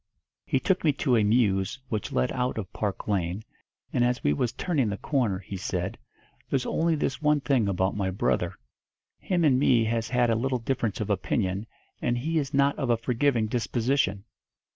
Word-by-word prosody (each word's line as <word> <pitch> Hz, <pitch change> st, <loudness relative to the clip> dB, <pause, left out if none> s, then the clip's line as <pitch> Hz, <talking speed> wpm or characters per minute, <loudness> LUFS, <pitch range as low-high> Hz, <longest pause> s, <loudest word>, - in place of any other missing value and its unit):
He 135 Hz, -, +2 dB
took 190 Hz, +6 st, +1 dB
me 150 Hz, -3 st, +4 dB
to 130 Hz, -2 st, +1 dB
a 110 Hz, -, +4 dB
mews 105 Hz, -2 st, +2 dB
what 110 Hz, -3 st, -3 dB
led 65 Hz, -, +1 dB
out 125 Hz, -1 st, -1 dB
of 100 Hz, -4 st, -5 dB
Park 105 Hz, -3 st, -3 dB
Lane, 95 Hz, 0 st, -1 dB, 0.5 s
and, 120 Hz, -, +2 dB
as 125 Hz, 0 st, 0 dB
we 75 Hz, -, +3 dB
was 115 Hz, +10 st, 0 dB
turning 135 Hz, -3 st, 0 dB
the 100 Hz, -, -3 dB
corner, 120 Hz, -9 st, 0 dB
he 95 Hz, +1 st, -8 dB
said, -, -, -3 dB, 0.5 s
'There's 135 Hz, -2 st, 0 dB
only 165 Hz, 0 st, +1 dB
this 145 Hz, -2 st, -2 dB
one 150 Hz, -1 st, +3 dB
thing 135 Hz, -6 st, +1 dB
about 95 Hz, 0 st, 0 dB
my 100 Hz, -2 st, -1 dB
brother, 90 Hz, -1 st, 0 dB, 0.6 s
him 180 Hz, -3 st, 0 dB
and 130 Hz, -4 st, +4 dB
me 125 Hz, -4 st, +4 dB
has 115 Hz, 0 st, -1 dB
had 120 Hz, -1 st, +2 dB
a -, -, +3 dB
little 130 Hz, +3 st, 0 dB
difference 115 Hz, -3 st, -2 dB
of 105 Hz, 0 st, -1 dB
opinion, 100 Hz, +1 st, -1 dB, 0.3 s
and 120 Hz, 0 st, +1 dB
he 160 Hz, +6 st, 0 dB
is 140 Hz, -2 st, -3 dB
not 140 Hz, 0 st, +3 dB
of 135 Hz, -4 st, -1 dB
a 120 Hz, -, +4 dB
forgiving 120 Hz, 0 st, +1 dB
disposition.' 115 Hz, -2 st, 0 dB
120 Hz, 190 wpm, -27 LUFS, 100-135 Hz, 0.6 s, me